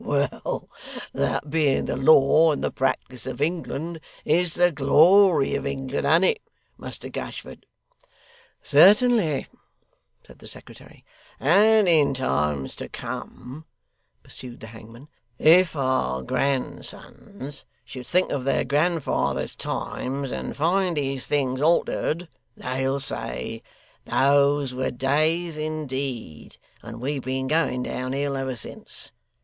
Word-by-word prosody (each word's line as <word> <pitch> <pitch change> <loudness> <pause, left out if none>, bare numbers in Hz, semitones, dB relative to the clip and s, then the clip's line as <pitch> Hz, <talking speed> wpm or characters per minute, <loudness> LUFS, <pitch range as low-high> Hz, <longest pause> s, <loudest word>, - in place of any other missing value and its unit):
Well! 140 -1 -2 0.5
That 145 - -2
being 150 -4 +2
the - - -2
law 155 +3 +5
and - - -4
the - - 0
practice 130 -1 -2
of 130 -1 -5
England, 165 +1 -3 0.3
is 165 +2 +1
the 175 0 +4
glory 160 +3 +5
of - - -2
England, 135 0 -3
an't 165 +5 +4
it, 450 - +1 0.3
Muster - - -9
Gashford?' - - -8 1.0
'Certainly,' 210 - +4 0.8
said - - -17
the - - -12
secretary. - - -11 0.3
'And 210 +7 +4
in 150 -5 +4
times 75 - -1
to - - -7
come,' 140 +6 -8 0.6
pursued 125 -2 -4
the - - -8
hangman, 115 +5 -13 0.3
'if 170 +1 +5
our 100 - 0
grandsons 140 - -4 0.2
should 125 -2 -9
think 180 +5 +2
of 140 -3 -2
their 135 - +1
grandfathers' 155 +3 0
times, 135 +1 -4
and - - -5
find 175 +2 +1
these 135 -2 -1
things 135 -2 0
altered, 165 +1 +1 0.3
they'll 130 +2 -2
say, 60 - -5 0.4
"Those 140 0 +2
were 130 +1 -1
days 155 +5 0
indeed, 135 - -5 0.2
and 115 0 -9
we've 135 +2 -3
been 130 +1 -2
going 135 -4 0
down 130 +1 -4
hill 140 0 -1
ever 135 -1 -3
since." 115 - -11
140 Hz, 120 wpm, -24 LUFS, 130-160 Hz, 1.0 s, law